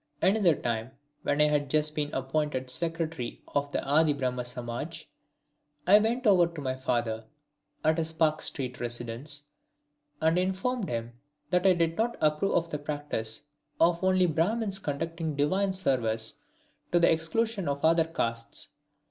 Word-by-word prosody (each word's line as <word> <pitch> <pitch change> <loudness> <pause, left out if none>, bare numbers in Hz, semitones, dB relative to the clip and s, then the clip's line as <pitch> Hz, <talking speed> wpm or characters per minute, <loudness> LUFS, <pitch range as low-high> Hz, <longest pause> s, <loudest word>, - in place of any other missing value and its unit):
Another 190 -4 +4
time, 115 +1 -3 0.3
when 145 - 0
I 150 - +6
had 145 -2 +1
just 150 +1 +2
been 150 -1 -2
appointed 135 -1 -1
Secretary 165 -4 -2
of 145 0 -1
the - - -2
Adi 150 +2 +4
Brahma 125 -3 -2
Samaj, 125 +6 -6 0.8
I 205 +4 +8
went 235 +4 0
over 185 -5 +6
to 170 -2 -9
my 130 -2 -1
father, 120 -4 -1 0.6
at 160 +1 +3
his 160 0 -1
Park 160 -1 +1
Street 125 -3 -3
residence, 120 +4 -4 0.8
and 160 +2 +3
informed 190 +5 -1
him 115 0 -3 0.4
that 180 +1 +3
I 185 - +7
did 165 -1 0
not 235 +2 +1
approve 155 +5 +2
of 170 0 +1
the 150 - -2
practice 145 -6 -4 0.4
of 170 +1 +3
only 185 -1 +4
Brahmins 195 +5 0
conducting 165 0 -3
divine 190 +8 +1
service 115 -11 0 0.5
to 175 - +4
the 170 - +5
exclusion 190 +4 0
of 140 +1 -1
other 165 0 +5
castes. 115 -8 -2
155 Hz, 150 wpm, -29 LUFS, 130-175 Hz, 0.8 s, I